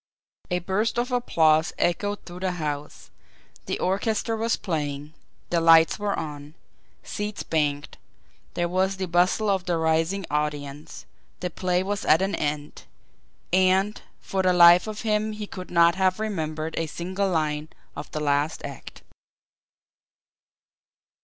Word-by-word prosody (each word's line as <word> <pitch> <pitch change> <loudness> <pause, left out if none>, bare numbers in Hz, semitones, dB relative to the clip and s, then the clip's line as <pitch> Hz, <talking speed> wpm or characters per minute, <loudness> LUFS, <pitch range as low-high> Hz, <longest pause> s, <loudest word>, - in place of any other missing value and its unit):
A 180 - +1
burst 195 +6 -1
of 245 +2 -1
applause 160 -10 +2
echoed 205 +4 -1
through 175 0 -9
the 185 -1 -1
house, 150 -3 -5 0.6
the - - -1
orchestra 215 +4 0
was 225 +1 0
playing, 150 -4 -4 0.4
the 170 -1 +2
lights 165 +2 +6
were 205 -1 -1
on, 150 0 -7 0.5
seats 210 0 -4
banged, 145 -2 -1 0.6
there 175 0 0
was 190 +2 0
the 190 - -2
bustle 180 +5 +2
of 190 -2 +1
the 175 -2 0
rising 165 +4 0
audience, 150 -1 -4 0.3
the 180 -1 -3
play 180 +1 0
was 205 +1 -3
at 160 +5 +4
an 195 +1 -1
end 145 0 -3 0.7
and 190 +2 +3 0.2
for 190 - -2
the 185 -1 +3
life 175 +2 +7
of 215 -1 -5
him 215 -1 0
he 210 0 -5
could 185 -2 -9
not 170 -1 +5
have 185 +1 +1
remembered 160 -7 -3
a 165 - -1
single 185 +5 -2
line 155 -2 -1 0.3
of - - -7
the 155 - -4
last 145 +1 0
act! - - -10
180 Hz, 140 wpm, -25 LUFS, 155-195 Hz, 0.7 s, life